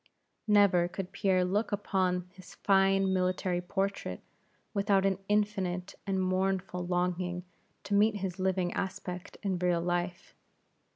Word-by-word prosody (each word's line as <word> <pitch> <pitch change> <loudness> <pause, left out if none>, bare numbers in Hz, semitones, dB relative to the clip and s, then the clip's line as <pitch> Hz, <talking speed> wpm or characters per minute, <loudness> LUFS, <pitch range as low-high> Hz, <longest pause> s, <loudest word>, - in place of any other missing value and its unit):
Never 200 -4 +5
could 180 +1 -6
Pierre 185 -2 +2
look 205 +6 0
upon 185 -3 0
his 185 -1 -14
fine 195 -1 +3
military 185 -1 0
portrait 195 +2 -2 0.5
without 200 -2 +2
an 195 -1 +1
infinite 195 -3 0
and 195 -1 0
mournful 185 0 0
longing 180 0 -1 0.4
to 205 - -4
meet 210 +2 +4
his 190 -2 -4
living 185 -1 0
aspect 180 -1 -5
in 195 -2 0
actual 175 -1 +1
life. 175 +1 -2
185 Hz, 125 wpm, -30 LUFS, 180-195 Hz, 0.5 s, Never